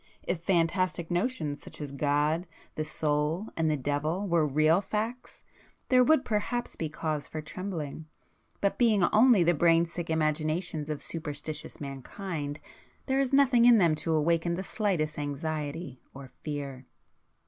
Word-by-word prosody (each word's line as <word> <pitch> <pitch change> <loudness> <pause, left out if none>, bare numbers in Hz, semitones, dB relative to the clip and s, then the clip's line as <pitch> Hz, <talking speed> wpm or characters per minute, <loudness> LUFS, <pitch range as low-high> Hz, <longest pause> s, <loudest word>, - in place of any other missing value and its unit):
If 175 - -2
fantastic 175 0 +1
notions 175 - -1
such - - -10
as 145 -2 -5
God, 150 +4 +1 0.3
the 155 - -2
Soul, 155 +5 -1
and 160 -1 +1
the 150 - +1
Devil 150 +8 -1
were 170 -4 +3
real 155 +5 +3
facts, 225 +5 -4 0.5
there 255 -1 +6
would 310 +1 +4
perhaps 235 +3 -2
be 160 - -3
cause 155 -1 -3
for 155 - -6
trembling, 160 -2 -5 0.5
but 200 - 0
being 220 -6 +4
only 220 -3 +6
the 175 +1 +4
brainsick 170 +1 +2
imaginations 155 0 -1
of 150 -2 -4
superstitious 155 -1 -6
mankind, 145 +2 -5 0.5
there 265 0 +1
is 270 -1 +1
nothing 265 -4 +5
in 240 -1 +8
them 170 -6 +4
to 160 +2 -2
awaken 170 +2 +1
the 190 - -4
slightest 175 -8 -1
anxiety 145 0 -4
or 135 -2 -10
fear." 140 -4 -5
160 Hz, 145 wpm, -29 LUFS, 150-190 Hz, 0.5 s, in